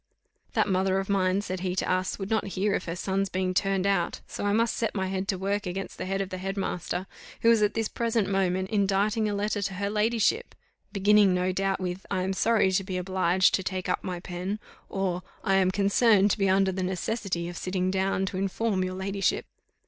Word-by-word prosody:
"That - - +2
mother 190 0 +1
of 195 +1 -2
mine," 190 0 +2
said 185 -2 -4
he 180 0 -2
to - - -1
us, 185 0 0
"would 195 +1 -5
not 220 -2 +1
hear 200 +2 +1
of - - -1
her 170 - -3
son's 195 +1 -1
being 185 0 -1
turned 195 0 +1
out 195 -3 +1
so - - -6
I - - +2
must 225 +2 +2
set 225 - -1
my 190 -2 -1
head 190 0 -2
to 195 - 0
work 200 +1 -1
against 190 +2 -5
the - - -3
head 195 +1 -1
of 195 - -3
the 185 - -4
head 195 +2 -4
master, 180 -1 -2 0.4
who 230 - +7
is 225 -2 +4
at 210 0 +2
this 225 -1 0
present 230 -3 0
moment 190 -1 0
inditing 205 +2 +1
a 205 - -1
letter 205 0 -1
to 195 -1 -2
her 200 +2 -2
ladyship, 225 - +1 0.4
beginning, 205 -1 +4
no 180 +1 +1
doubt, 195 +1 0
with, 180 0 -4
'I 185 -2 0
am 190 +1 -1
sorry 210 -1 +3
to 190 +1 +1
be 185 -1 -4
obliged 185 0 +2
to - - +2
take 185 -1 -3
up 180 - 0
my 180 -2 -4
pen,' 180 +3 -4 0.3
or, 185 -2 -1 0.2
'I 195 - +1
am 190 -1 +4
concerned 200 +1 +4
to - - +1
be 195 -1 +3
under 190 0 +3
the 190 0 -3
necessity 185 -1 -2
of 175 - -7
sitting 185 +1 -1
down 190 0 0
to 190 - -4
inform 195 +1 0
your 185 0 -3
ladyship. 195 +1 -1
195 Hz, 225 wpm, -27 LUFS, 185-200 Hz, 0.4 s, who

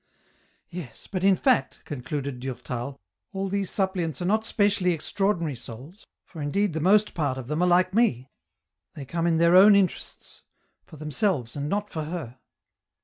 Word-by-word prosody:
" - - -36 0.3
Yes, 155 -10 -9
but 185 -2 -4
in 195 -1 +5
fact," 135 -5 +1
concluded 140 -1 -5
Durtal, 130 0 -5 0.2
" - - -55
all 195 0 -2
these 195 -1 -1
sup 190 -2 0
pliants 165 -7 -3
are 175 - -3
not 215 +4 +2
specially 200 -5 +2
extraordinary 170 -2 -1
souls, 125 - -11 0.2
for 165 - -10
indeed 190 +6 0
the 160 - -2
most 205 +6 +3
part 145 -5 -1
of 130 - -6
them 150 +4 -1
are 180 - +3
like 180 +1 +3
me, 145 - +2 0.7
they 140 - -7
come 165 +5 -1
in 165 -1 +2
their 170 +2 +4
own 200 +2 +8
interests, 195 -3 -2 0.5
for 155 - -13
themselves 150 - -1
and 145 0 -3
not 205 +3 -1
for 155 -2 -4
Her." 150 -7 -6
170 Hz, 180 wpm, -26 LUFS, 140-195 Hz, 0.7 s, own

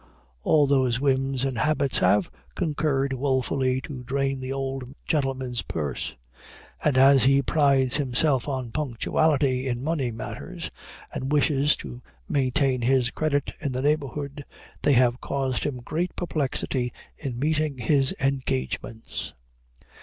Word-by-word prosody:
All 150 - +4
those 130 -3 +2
whims 135 -1 +1
and 130 -4 -2
habits 140 -2 +2
have 95 +1 +3 0.2
concurred 145 -5 0
woefully 130 -1 0
to 130 -3 -7
drain 135 +1 -1
the 130 0 -4
old 135 -1 -4
gentleman's 130 - -1
purse; 75 -6 -4 0.7
and 145 -4 +2
as 135 0 +7
he 140 +1 +4
prides 135 -4 +3
himself 135 -1 +1
on 130 -4 -3
punctuality 135 0 +1
in 120 0 -2
money 150 -5 0
matters, 115 0 -6 0.4
and 135 +2 -3
wishes 145 -1 +3
to 60 -3 -9 0.3
maintain 130 -1 +1
his 125 0 +2
credit 145 -3 -1
in 140 -4 -3
the 130 +1 -2
neighborhood, 145 -1 -1 0.4
they 145 - +4
have 125 0 +3
caused 135 -4 -1
him 145 -3 -2
great 160 +8 -3
perplexity 135 -6 -1 0.3
in 130 -5 -4
meeting 150 0 0
his 135 +3 +3
engagements. 115 - -2
135 Hz, 130 wpm, -25 LUFS, 125-145 Hz, 0.7 s, as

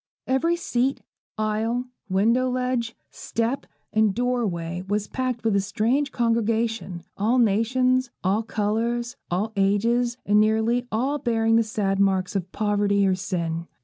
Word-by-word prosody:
Every 265 +7 +2
seat, 270 -5 -1 0.3
aisle, 220 +3 -1 0.2
window 230 +7 +2
ledge, 250 -2 -1 0.2
step, 230 +4 -2 0.3
and 215 -3 +3
door 245 -1 +1
way, 170 0 -4
was 205 +1 0
packed 255 -3 -3
with 220 -3 +2
a 200 - +3
strange 235 +8 0
congregation; 230 -5 0
all 220 +5 +2
nations, 250 +3 +2
all 195 +4 +2
colours, 230 +3 -1
all 205 +6 -1
ages, 230 +5 +1
and 205 +1 +4
nearly 220 +3 +2
all 265 +7 0
bearing 225 -2 +2
the 230 - +5
sad 205 -3 -1
marks 190 -1 +1
of 185 -1 -2
poverty 205 -1 +1
or 190 - +3
sin. 170 -3 -3
225 Hz, 140 wpm, -24 LUFS, 200-245 Hz, 0.3 s, the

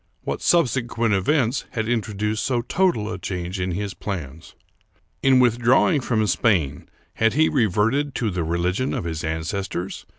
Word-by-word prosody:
What - - -3
subsequent 120 -8 +1
events 120 +6 +1
had 110 -4 -2
introduced 105 -2 -1
so 120 -3 0
total 170 - +1
a 90 - -6
change 90 0 -4
in 90 0 -1
his 100 +2 -3
plans? 80 -6 -7 0.7
In 130 -1 +5
withdrawing 125 +6 +3
from 110 -3 0
Spain, 85 - 0 0.2
had 110 0 +2
he 155 +2 +3
reverted 120 +4 +1
to 115 -4 -1
the 90 -2 -2
religion 90 +9 -1
of - - -3
his 80 -2 -4
ancestors 85 +3 -4
110 Hz, 145 wpm, -23 LUFS, 90-125 Hz, 0.7 s, In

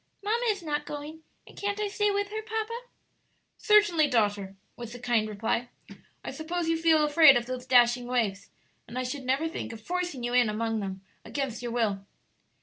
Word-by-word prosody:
"Mamma 465 +4 0
is 400 -4 -1
not 295 -2 -2
going, 300 +2 -7 0.2
and - - -16
can't 405 +1 -3
I 420 - 0
stay 415 +1 0
with 405 0 -1
her, 435 +1 -4
papa?" 445 +1 -3 0.9
"Certainly, 410 -8 +4
daughter," 205 -6 0 0.2
was 235 -1 -8
the 245 - -9
kind 235 -2 +1
reply. 225 +3 -2 0.6
"I - - -4
suppose 335 +2 -3
you 330 - +2
feel 320 -2 +4
afraid 295 -3 +7
of 240 - -2
those 255 0 -6
dashing 245 -1 +4
waves, 225 -6 -1 0.4
and 245 - -8
I 255 - -1
should 255 +1 -5
never 270 +5 +1
think 320 - -5
of 225 - -9
forcing 350 -1 -3
you 240 0 -2
in 245 -3 +4
among 225 +1 -1
them 190 -1 -5 0.2
against 270 -5 -4
your 240 -1 -4
will." 215 -5 0
265 Hz, 190 wpm, -28 LUFS, 235-345 Hz, 0.9 s, afraid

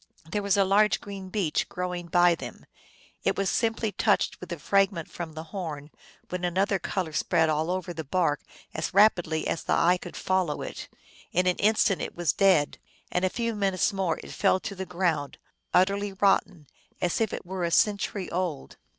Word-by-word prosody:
There 185 +6 -2
was 200 0 +1
a 195 - +4
large 210 +2 +3
green 195 -2 -8
beech 185 -6 -1
grow 180 -1 -3
ing 175 -1 -5
by 175 0 +5
them. 165 - -8 0.6
It - - +1
was 195 -1 +1
simply 225 -1 0
touched 205 0 +1
with 180 - -9
the 170 - -4
frag 195 +5 +3
ment 165 -4 -6
from 165 -2 -6
the 160 +1 -6
horn 155 -6 -5 0.4
when 180 0 -4
another 190 +3 +1
color 175 -2 -3
spread 160 +1 +2
all 155 +2 0
over 180 -1 -2
the 160 -1 -5
bark 150 -1 0 0.3
as 155 +3 -3
rapidly 175 -6 +4
as - - -1
the - - 0
eye 175 +2 +4
could 175 -1 -9
follow 185 -5 0
it: - - -7 0.4
in 180 +1 +2
an 180 -1 +2
instant 210 -2 +2
it - - -5
was 170 -4 +1
dead, 185 -7 +3 0.3
and 180 - 0
in - - +4
a - - -4
few 230 -1 -1
minutes 195 -1 +1
more 190 -5 -1
it - - -10
fell - - +2
to 200 - -5
the 190 -1 -6
ground, 170 -6 -1 0.3
utterly 200 +2 +2
rotten, 190 -4 +1 0.3
as 175 +5 0
if 220 - +1
it - - -6
were 185 0 -4
a 170 - +1
century 200 +1 +1
old. 170 -5 -3
185 Hz, 200 wpm, -27 LUFS, 170-195 Hz, 0.6 s, by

